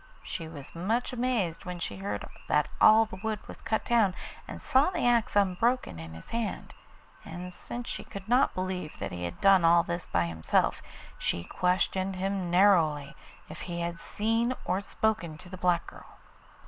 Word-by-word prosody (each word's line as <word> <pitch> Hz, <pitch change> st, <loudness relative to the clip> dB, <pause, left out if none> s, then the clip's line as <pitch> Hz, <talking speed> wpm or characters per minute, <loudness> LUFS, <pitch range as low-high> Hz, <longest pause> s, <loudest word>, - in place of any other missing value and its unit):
She 165 Hz, -3 st, -5 dB
was 145 Hz, -4 st, -10 dB
much 220 Hz, +10 st, -1 dB
amazed 235 Hz, -9 st, -1 dB
when 180 Hz, -1 st, -5 dB
she 100 Hz, -, -5 dB
heard 100 Hz, +1 st, -4 dB, 0.2 s
that 150 Hz, -, +2 dB
all 220 Hz, +1 st, +8 dB
the 200 Hz, -3 st, -9 dB
wood 220 Hz, -1 st, -1 dB
was -, -, -10 dB
cut 220 Hz, -, -1 dB
down, 220 Hz, -6 st, +3 dB, 0.3 s
and -, -, -7 dB
saw 265 Hz, +6 st, +3 dB
the 370 Hz, -, -1 dB
axe 240 Hz, -1 st, +3 dB
unbroken 200 Hz, -, +2 dB
in 80 Hz, 0 st, -8 dB
his 80 Hz, -, -11 dB
hand, 230 Hz, -2 st, -3 dB, 0.5 s
and 180 Hz, +1 st, -7 dB
since 240 Hz, +5 st, -7 dB
she -, -, -4 dB
could 195 Hz, 0 st, -9 dB
not 250 Hz, +4 st, +3 dB
believe 185 Hz, -3 st, -3 dB
that -, -, -4 dB
he 90 Hz, 0 st, -4 dB
had 85 Hz, -, -6 dB
done 195 Hz, -2 st, +6 dB
all 170 Hz, +1 st, +6 dB
this 170 Hz, 0 st, -4 dB
by 85 Hz, -1 st, +1 dB
himself, 80 Hz, -1 st, +1 dB, 0.4 s
she 85 Hz, -, -1 dB
questioned 185 Hz, -, 0 dB
him 190 Hz, -1 st, -2 dB
narrowly 165 Hz, -6 st, +4 dB, 0.3 s
if -, -, -9 dB
he 170 Hz, -1 st, -4 dB
had 170 Hz, 0 st, -3 dB
seen 225 Hz, +6 st, 0 dB
or 190 Hz, -, 0 dB
spoken 200 Hz, -7 st, -1 dB
to 180 Hz, -, -13 dB
the 185 Hz, -, -7 dB
black 175 Hz, -1 st, +2 dB
girl. -, -, -13 dB
185 Hz, 180 wpm, -29 LUFS, 165-220 Hz, 0.5 s, all